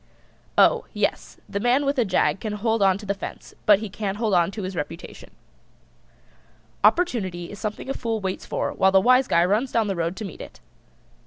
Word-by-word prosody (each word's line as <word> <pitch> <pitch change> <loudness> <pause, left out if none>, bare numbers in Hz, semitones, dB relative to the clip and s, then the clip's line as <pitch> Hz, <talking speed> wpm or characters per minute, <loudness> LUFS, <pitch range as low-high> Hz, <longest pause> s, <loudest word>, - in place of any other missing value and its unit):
Oh, - - +5
yes, - - -2
the 200 - -3
man 245 +6 +2
with 280 -1 0
a 240 - +3
jag 190 0 +1
can 215 0 -4
hold 225 +1 0
on 195 -1 +4
to 205 - -11
the 200 - 0
fence, 195 - -9
but 205 -2 +8
he 220 +2 -5
can't 200 0 -4
hold 220 -2 0
on 175 -1 +3
to 205 +1 -6
his 185 0 -5
reputation. 165 +2 -7 1.5
Opportunity 190 - +1
is 205 - -9
something 210 +2 -5
a 270 - -1
Fool 230 -4 -2
waits 190 -2 -4
for - - -2
while 190 0 +3
the 190 - +6
Wise 255 +5 +4
Guy 170 +1 +3
runs 215 +8 0
down 230 -2 +2
the 195 -2 -2
road 170 +1 -2
to 215 - -6
meet 190 - -9
it. - - -11
205 Hz, 210 wpm, -24 LUFS, 190-230 Hz, 1.5 s, but